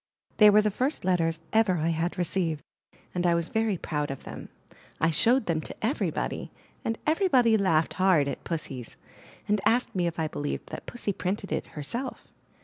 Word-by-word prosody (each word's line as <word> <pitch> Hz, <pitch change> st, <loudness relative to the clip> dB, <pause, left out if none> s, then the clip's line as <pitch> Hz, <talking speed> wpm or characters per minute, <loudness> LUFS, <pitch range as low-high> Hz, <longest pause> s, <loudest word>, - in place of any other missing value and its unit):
They 210 Hz, -1 st, +9 dB
were 210 Hz, +1 st, +6 dB
the 210 Hz, -, +1 dB
first 255 Hz, -, -1 dB
letters 165 Hz, -3 st, +1 dB
I 220 Hz, -, +6 dB
ever 205 Hz, -5 st, +3 dB
had 165 Hz, +1 st, -1 dB
received, 170 Hz, -3 st, -1 dB, 0.5 s
and 180 Hz, -, -1 dB
I 170 Hz, -, +4 dB
was 170 Hz, -1 st, -1 dB
very 220 Hz, -3 st, +1 dB
proud 150 Hz, -2 st, -2 dB
of 135 Hz, -, -6 dB
them. -, -, -8 dB, 0.5 s
I 165 Hz, -, +3 dB
showed 235 Hz, -, +3 dB
them 160 Hz, -2 st, 0 dB
to -, -, -8 dB
everybody, 260 Hz, +6 st, -2 dB, 0.3 s
and 225 Hz, 0 st, -1 dB
everybody 290 Hz, -, +4 dB
laughed 165 Hz, -6 st, +2 dB
hard 180 Hz, -7 st, +4 dB
at -, -, -4 dB
Pussy's, 135 Hz, -8 st, -4 dB, 0.5 s
and 210 Hz, -1 st, +2 dB
asked 245 Hz, +2 st, +2 dB
me 175 Hz, -2 st, +1 dB
if 170 Hz, -, -4 dB
I 160 Hz, -1 st, 0 dB
believed 145 Hz, -1 st, -4 dB
that -, -, -7 dB
Pussy 225 Hz, -4 st, -3 dB
printed 195 Hz, +2 st, -3 dB
it -, -, -2 dB
herself. 235 Hz, -, -4 dB
180 Hz, 180 wpm, -27 LUFS, 160-220 Hz, 0.5 s, They